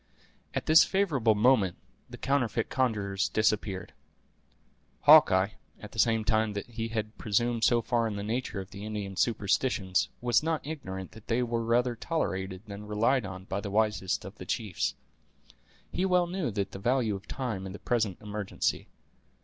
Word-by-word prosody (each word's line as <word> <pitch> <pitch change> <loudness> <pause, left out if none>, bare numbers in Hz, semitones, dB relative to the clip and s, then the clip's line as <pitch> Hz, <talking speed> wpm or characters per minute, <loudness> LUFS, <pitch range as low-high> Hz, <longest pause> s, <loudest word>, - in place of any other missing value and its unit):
At - - -1
this 155 +1 +8
favorable 145 - +2
moment 105 -4 +3 0.3
the - - -9
counterfeit 125 -5 0
conjurers 105 -7 0
disappeared. 105 -4 0 1.1
Hawkeye, - - +7 0.3
at - - -10
the - - -8
same 115 -2 +3
time 110 -1 +2
that 100 - -4
he 115 -1 -4
had 110 -1 -4
presumed 115 +2 0
so 120 0 +4
far 115 0 +1
on 105 - -4
the 100 - -4
nature 110 -1 -2
of 95 +1 -8
the 100 +1 -8
Indian 105 -2 -4
superstitions, 100 -3 +1
was 120 -2 +3
not 160 -1 -1
ignorant 95 - -6
that 110 0 -15
they 120 +2 +1
were 115 -1 -1
rather 120 +1 +2
tolerated 95 - -3
than 105 0 -8
relied 110 +3 +1
on 95 -1 -8
by 100 +1 -3
the 100 - -5
wisest 105 -3 0
of 100 - -8
the - - -7
chiefs. 105 -7 -2 1.0
He 180 - -1
well 180 -2 +3
knew 175 -5 -2
the 100 -2 -1
value 120 0 +1
of 95 - -9
time 110 -8 -4
in - - -7
the 100 - -7
present 110 -7 -1
emergency. 105 -1 -2
110 Hz, 165 wpm, -29 LUFS, 100-120 Hz, 1.1 s, this